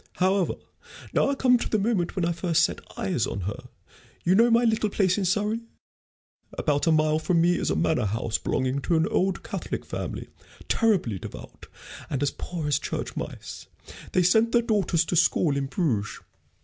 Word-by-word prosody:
However, 185 Hz, 0 st, +1 dB, 0.6 s
now -, -, +3 dB
I 280 Hz, -, 0 dB
come 250 Hz, -2 st, +4 dB
to -, -, -3 dB
the 215 Hz, -, +2 dB
moment 200 Hz, -4 st, 0 dB
when 180 Hz, -, 0 dB
I 170 Hz, -, +1 dB
first 170 Hz, -1 st, +1 dB
set -, -, 0 dB, 0.2 s
eyes 155 Hz, -12 st, 0 dB
on 100 Hz, -, -4 dB
her. 105 Hz, +8 st, -5 dB, 0.6 s
You 175 Hz, -, +3 dB
know 230 Hz, +5 st, +5 dB
my 235 Hz, +1 st, +4 dB
little 220 Hz, -2 st, +2 dB
place 190 Hz, -3 st, +2 dB
in 200 Hz, -, -1 dB
Surrey? 210 Hz, +5 st, 0 dB, 0.9 s
About 145 Hz, +2 st, 0 dB
a -, -, +5 dB
mile 155 Hz, 0 st, +3 dB
from 170 Hz, +1 st, +1 dB
me 175 Hz, +1 st, +3 dB
is -, -, -1 dB
a -, -, +1 dB
manor 125 Hz, -9 st, +1 dB
house 110 Hz, +2 st, -1 dB
belonging 130 Hz, +2 st, -1 dB
to 170 Hz, -, 0 dB
an 160 Hz, 0 st, +3 dB
old 190 Hz, 0 st, 0 dB
Catholic -, -, -5 dB
family, -, -, -5 dB, 0.4 s
terribly 185 Hz, -, +1 dB
devout -, -, -10 dB, 0.4 s
and 140 Hz, 0 st, -1 dB
as 140 Hz, -, +1 dB
poor 165 Hz, 0 st, -5 dB
as 145 Hz, -1 st, +2 dB
church -, -, -4 dB
mice. -, -, -7 dB, 0.5 s
They 180 Hz, -, +3 dB
sent 220 Hz, +6 st, +3 dB
their 240 Hz, -1 st, +4 dB
daughters 190 Hz, -7 st, +1 dB
to 175 Hz, -, -2 dB
school 155 Hz, -2 st, +3 dB
in 140 Hz, -1 st, -1 dB
Bruges. 125 Hz, -, -1 dB
175 Hz, 190 wpm, -26 LUFS, 145-205 Hz, 0.9 s, know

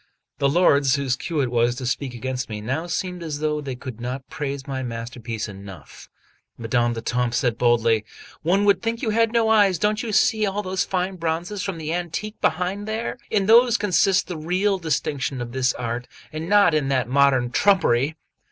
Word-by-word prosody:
The 140 Hz, -1 st, +3 dB
lords 140 Hz, -4 st, +4 dB
whose 135 Hz, -3 st, 0 dB
cue 155 Hz, +3 st, -2 dB
it 125 Hz, -3 st, -1 dB
was 120 Hz, 0 st, +2 dB
to 125 Hz, -, -6 dB
speak 125 Hz, +1 st, -2 dB
against 130 Hz, +1 st, -4 dB
me, 105 Hz, -1 st, -5 dB
now 135 Hz, +10 st, -3 dB
seemed 180 Hz, +1 st, -3 dB
as 155 Hz, -3 st, -4 dB
though 150 Hz, 0 st, -1 dB
they 135 Hz, -3 st, -5 dB
could 125 Hz, -2 st, -9 dB
not 130 Hz, +2 st, -5 dB
praise 140 Hz, -2 st, -4 dB
my 135 Hz, -1 st, -4 dB
masterpiece 115 Hz, -2 st, -5 dB
enough. 100 Hz, -5 st, -11 dB, 0.5 s
Madame 120 Hz, +1 st, 0 dB
d'Etampes 120 Hz, +1 st, -1 dB
said 120 Hz, -4 st, 0 dB
boldly: 115 Hz, -2 st, +3 dB, 0.4 s
"One 190 Hz, +6 st, +2 dB
would 200 Hz, -3 st, +4 dB
think 230 Hz, 0 st, -3 dB
you 220 Hz, -, +1 dB
had 225 Hz, +1 st, +2 dB
no 230 Hz, -1 st, +2 dB
eyes! 205 Hz, -4 st, +4 dB
Don't 210 Hz, +4 st, 0 dB
you 230 Hz, -, -4 dB
see 215 Hz, +1 st, +3 dB
all 205 Hz, 0 st, -1 dB
those 185 Hz, 0 st, -1 dB
fine 185 Hz, 0 st, -2 dB
bronzes 170 Hz, +4 st, -2 dB
from 195 Hz, -3 st, -3 dB
the 160 Hz, 0 st, -3 dB
antique 175 Hz, +5 st, -4 dB
behind 185 Hz, +5 st, -1 dB
there? 220 Hz, +3 st, -3 dB
In 200 Hz, -3 st, +1 dB
those 235 Hz, +2 st, +6 dB
consists 195 Hz, -1 st, +2 dB
the 175 Hz, -, -6 dB
real 185 Hz, +5 st, 0 dB
distinction 145 Hz, -4 st, -2 dB
of 120 Hz, -1 st, -5 dB
this 125 Hz, 0 st, +1 dB
art, 120 Hz, 0 st, -4 dB, 0.3 s
and 160 Hz, +2 st, -5 dB
not 205 Hz, -4 st, +5 dB
in 150 Hz, -3 st, +1 dB
that 130 Hz, -4 st, 0 dB
modern 130 Hz, -2 st, +3 dB
trumpery." 155 Hz, -6 st, +2 dB
150 Hz, 190 wpm, -23 LUFS, 125-190 Hz, 0.5 s, those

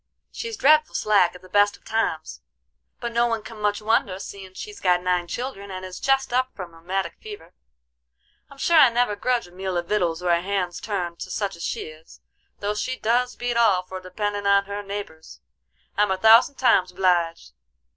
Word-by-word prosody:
She's 460 Hz, -2 st, -6 dB
dreadful 305 Hz, +2 st, +4 dB
slack 200 Hz, -5 st, +3 dB
at 180 Hz, -, -13 dB
the -, -, -13 dB
best 205 Hz, +2 st, +3 dB
of -, -, -34 dB
times, 160 Hz, -, -2 dB, 0.6 s
but 235 Hz, -, -4 dB
no 235 Hz, +1 st, +2 dB
one 225 Hz, -2 st, -2 dB
can 220 Hz, -1 st, -10 dB
much 210 Hz, 0 st, 0 dB
wonder, 215 Hz, -4 st, +1 dB
seein' 190 Hz, -1 st, -9 dB
she's 420 Hz, -, -8 dB
got 180 Hz, -1 st, +3 dB
nine 180 Hz, -1 st, 0 dB
children, 235 Hz, -3 st, -5 dB
and 185 Hz, -1 st, -6 dB
is 185 Hz, -1 st, -8 dB
jest 270 Hz, -2 st, +1 dB
up 255 Hz, +1 st, +2 dB
from 180 Hz, -4 st, -8 dB
a -, -, -15 dB
rheumatic 175 Hz, +1 st, -3 dB
fever. 420 Hz, -1 st, -10 dB, 1.0 s
I'm 280 Hz, -, -15 dB
sure 335 Hz, +4 st, +3 dB
I 275 Hz, -5 st, +8 dB
never 235 Hz, -2 st, +1 dB
grudge 245 Hz, +2 st, 0 dB
a 175 Hz, -, -16 dB
meal 185 Hz, 0 st, -3 dB
of 175 Hz, -, -2 dB
vittles 175 Hz, -5 st, 0 dB
or 175 Hz, -, +2 dB
a 170 Hz, 0 st, +3 dB
hand's 185 Hz, -2 st, -2 dB
turn 180 Hz, -5 st, -3 dB
to -, -, -7 dB
such 200 Hz, -4 st, -2 dB
as 170 Hz, -, -9 dB
she -, -, -2 dB
is, 155 Hz, +1 st, -12 dB, 0.4 s
though 205 Hz, +1 st, -1 dB
she 255 Hz, +5 st, -3 dB
does 245 Hz, +2 st, +1 dB
beat 245 Hz, -1 st, -2 dB
all 205 Hz, -6 st, +4 dB
for 185 Hz, +1 st, -8 dB
dependin' 205 Hz, +2 st, -3 dB
on 200 Hz, 0 st, +4 dB
her 200 Hz, +1 st, -5 dB
neighbors. 195 Hz, -, -8 dB, 0.6 s
I'm 210 Hz, 0 st, +2 dB
a 190 Hz, -, 0 dB
thousand 225 Hz, +7 st, +6 dB
times 185 Hz, -9 st, +3 dB
obleeged. 175 Hz, -, 0 dB
200 Hz, 200 wpm, -24 LUFS, 180-230 Hz, 1.0 s, I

